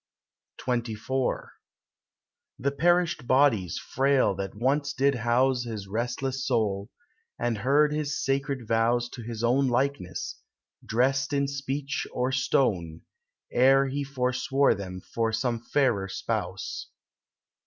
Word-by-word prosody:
XXIV 125 +1 -2 1.1
The 140 +3 0
perished 175 -3 +2
bodies 130 -10 +3
frail 135 -5 +2
that 95 0 -5
once 140 +5 0
did 140 0 +2
house 125 +1 +2
His 110 -4 -5
restless 125 +5 -2
soul, 105 -6 0 0.5
and 115 -3 -1
heard 145 +6 +3
his 150 0 -2
sacred 135 -4 -1
vows 115 +2 +2
To 120 - -9
his 115 0 -6
own 130 +3 +3
likeness, 125 -6 -2 0.4
dressed 135 +5 +1
in 140 0 +2
speech 140 0 -3
or 125 +1 -1
stone, 95 -11 +1 0.5
Ere 135 +2 +5
he 140 +2 -2
forswore 130 0 +1
them 90 -2 -6
for 115 +3 -1
some 115 +1 -1
fairer 115 -5 +1
spouse. - - -4
130 Hz, 115 wpm, -27 LUFS, 115-140 Hz, 1.1 s, Ere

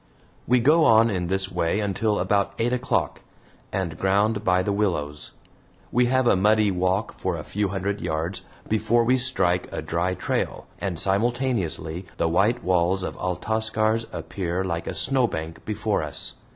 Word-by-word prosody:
We 125 +1 +4
go 155 +7 +4
on 115 0 +5
in 90 -3 -2
this 95 +1 0
way 90 +2 0
until 105 +1 0
about 100 -1 +1
eight 120 +2 0
o'clock, 125 +1 -1 0.5
and 90 -4 -3
ground 105 +3 +2
by 90 -2 +2
the 100 - -1
willows. 75 -8 -2 0.6
We 125 0 +3
have 130 +1 +2
a 120 - +5
muddy 105 +2 +3
walk 95 +4 -1
for 95 -2 -1
a 75 - -6
few 105 0 -1
hundred 100 +2 -3
yards 80 +4 -3 0.2
before 115 +2 +2
we 130 +3 +3
strike 90 -9 +1
a - - -4
dry 90 +2 -1
trail, - - -2
and 90 -5 -3
simultaneously 100 -6 -1
the - - +1
white 105 +8 +2
walls 90 +1 +1
of - - -4
Altascar's 110 +4 0
appear 90 -1 -3
like 85 -2 -3
a - - -3
snowbank 100 -12 0
before 105 0 -1
us. 75 -1 -4
100 Hz, 160 wpm, -24 LUFS, 90-110 Hz, 0.6 s, on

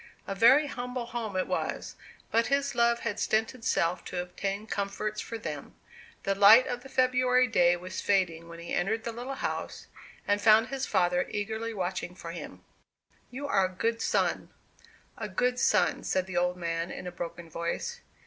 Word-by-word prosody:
A - - -3
very 245 +9 +6
humble 250 -3 -4
home 235 -4 -5
it 185 - +1
was; - - -3 0.4
but 230 +1 +3
his 280 0 +1
love 235 0 +2
had 210 -3 -3
stinted 225 +3 0
self 170 -3 +1
to 180 - -4
obtain 195 +3 -3
comforts 210 +1 -3
for 230 - -6
them. 150 -9 -7 0.5
The 195 - +1
light 205 +5 +8
of 245 -1 -4
the 270 - -12
February 255 -1 +3
day 175 -7 +4
was 185 +2 -6
fading 170 -5 +1
when 170 0 -10
he 170 0 -7
entered 220 +5 0
the 235 - -3
little 245 +4 -5
house, - - -4 0.4
and 205 0 +2
found 220 +1 +6
his 270 0 -3
father 180 0 +2
eagerly 220 +2 -3
watching 185 -3 -3
for 170 -2 -7
him. 170 - -9 0.7
"You 270 +3 -6
are 195 -8 +3
a - - -2
good 230 +5 -1
son, - - 0 0.7
a 215 -2 -4
good 250 +6 0
son," - - +2
said 185 -1 0
the 190 -1 -7
old 180 +1 +1
man, 170 0 -2
in - - -7
a 180 - -4
broken 170 -1 -7
voice. 170 - -4
210 Hz, 180 wpm, -29 LUFS, 180-240 Hz, 0.7 s, light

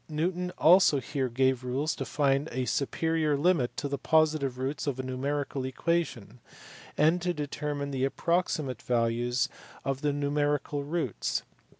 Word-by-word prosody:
Newton 180 +3 -1
also 165 -3 +6
here 135 0 -2
gave 130 +1 +1
rules 135 +5 -1
to 135 - -4
find 140 +2 +1
a 130 +1 -1
superior 155 +2 0
limit 150 -5 +1
to 145 - -2
the 140 0 -3
positive 155 -5 +2
roots 135 +4 -3
of 135 -2 -1
a - - -2
numerical 135 +1 -2
equation, 130 -5 -2 0.6
and 160 +4 +4
to 175 0 -1
determine 145 -1 -3
the 135 0 0
approxi 170 -1 0
mate 130 -4 -6
values 120 +1 +1 0.4
of 135 0 -1
the 150 -1 +1
numerical 145 0 0
roots. 150 - -2
140 Hz, 150 wpm, -29 LUFS, 130-155 Hz, 0.6 s, also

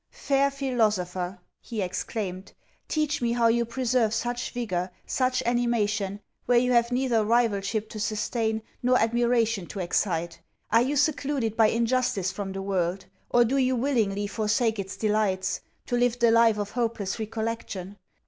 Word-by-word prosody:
'Fair 275 0 +1
philosopher,' 210 -9 -1 0.2
he 230 -3 -6
exclaimed, 185 0 -4 0.3
'teach 305 -2 0
me 235 -1 +1
how 235 -1 +2
you 235 +1 +3
preserve 235 -2 0
such 240 +2 -2
vigour, 185 -7 -2 0.2
such 255 -1 0
animation, 215 -4 0 0.3
where 245 0 +4
you 250 +1 +3
have 235 0 +3
neither 245 -3 +2
rivalship 215 -2 +1
to 215 - -8
sustain, 220 +1 -1 0.2
nor 250 +1 +4
admiration 230 -4 +1
to - - -9
excite? 170 -2 -1 0.3
Are 225 +2 +5
you 270 +4 0
secluded 275 -5 0
by 225 -1 +5
injustice 230 -4 +1
from 200 -2 -5
the 195 0 -5
world? 190 -1 -1 0.2
Or, 240 0 +5
do 265 +4 0
you 260 -1 +2
willingly 225 -6 0
forsake 220 +1 0
its 195 0 -5
delights, 205 -3 0 0.2
to 245 - -1
live 245 0 +2
the 235 -2 +4
life 230 -1 +5
of 205 -1 -3
hopeless 225 -4 -2
recollection? 220 -3 -4
225 Hz, 150 wpm, -26 LUFS, 205-245 Hz, 0.3 s, Are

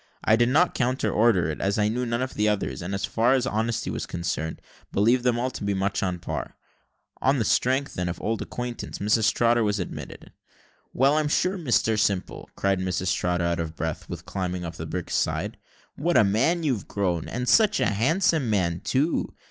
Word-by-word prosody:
I 110 - +5
did 120 +1 +3
not 165 +7 +3
counter 130 +1 0
order 105 -7 +3
it, - - -6
as 100 +1 0
I 105 -1 +2
knew 120 +3 -1
none 115 +2 0
of 130 - -4
the 105 0 +1
others, 100 -10 -2
and, 95 +3 -3
as 100 0 -1
far 115 +5 +2
as 130 -2 +1
honesty 115 -1 -1
was - - -4
concerned, 80 -2 -3 0.3
believed 120 +5 +3
them 125 -2 +2
all 125 +2 -1
to - - -7
be 100 0 0
much 95 +1 -1
on 90 -2 0
a - - -9
par. 85 - -5 0.7
On 135 +2 +3
the 115 - 0
strength, 130 +6 +1
then, 90 0 -2
of 85 - -5
old 110 +1 -2
acquaintance, 125 -1 -5
Mrs 105 +2 +2
Trotter 120 0 +2
was 105 -1 0
admitted. 90 - -7 0.6
"Well, 135 +4 +3
I'm 155 - 0
sure, 185 +5 +1
Mr 120 - +1
Simple," 100 -3 -1
cried 100 -1 +1
Mrs 95 0 -1
Trotter, 90 -1 0
out 85 0 0
of 80 -1 -4
breath 80 -1 -4
with - - -7
climbing 90 -2 -3
up 85 - -5
the 80 - -5
brig's 90 +2 -4
side; - - -1 0.4
"what 170 +4 +2
a - - +7
man 130 - +2
you've 130 -10 -1
grown, 90 -5 -1
and 125 +1 -3
such 215 - +4
a - - +2
handsome 145 - +2
man, 90 -5 +1
too! 145 +6 0
110 Hz, 210 wpm, -25 LUFS, 95-125 Hz, 0.7 s, a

